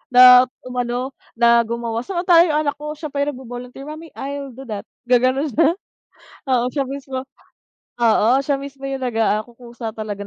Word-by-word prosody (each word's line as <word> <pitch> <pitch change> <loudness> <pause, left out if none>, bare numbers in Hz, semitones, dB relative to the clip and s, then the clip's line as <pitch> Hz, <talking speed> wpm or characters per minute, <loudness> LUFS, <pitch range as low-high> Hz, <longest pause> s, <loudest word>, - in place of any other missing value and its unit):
na 250 0 +9 0.2
umano, 250 0 -3 0.3
na 235 -1 +4
gumawa. 230 0 -3
Samantala 350 -2 +4
yung 300 -2 +1
anak 285 -1 -2
ko 300 +1 -5
siya 310 0 -7
pa 280 0 -1
yung 295 - -2
nagvo-volunteer, 250 +1 -9
"Mommy 310 +1 -10
I'll 280 -1 -6
do 260 - -11
that." 210 -1 -5 0.2
Gaganon 255 +4 +3
siya 320 +5 +3 0.8
oo, 245 -2 +2
siya 280 - 0
mismo. 270 -1 -5 0.8
Oo, 225 -1 +4
siya 275 0 0
mismo 275 0 -10
yung 275 0 -3
nagakukusa 230 0 -2
talaga 205 -2 -5
255 Hz, 160 wpm, -20 LUFS, 235-285 Hz, 0.8 s, na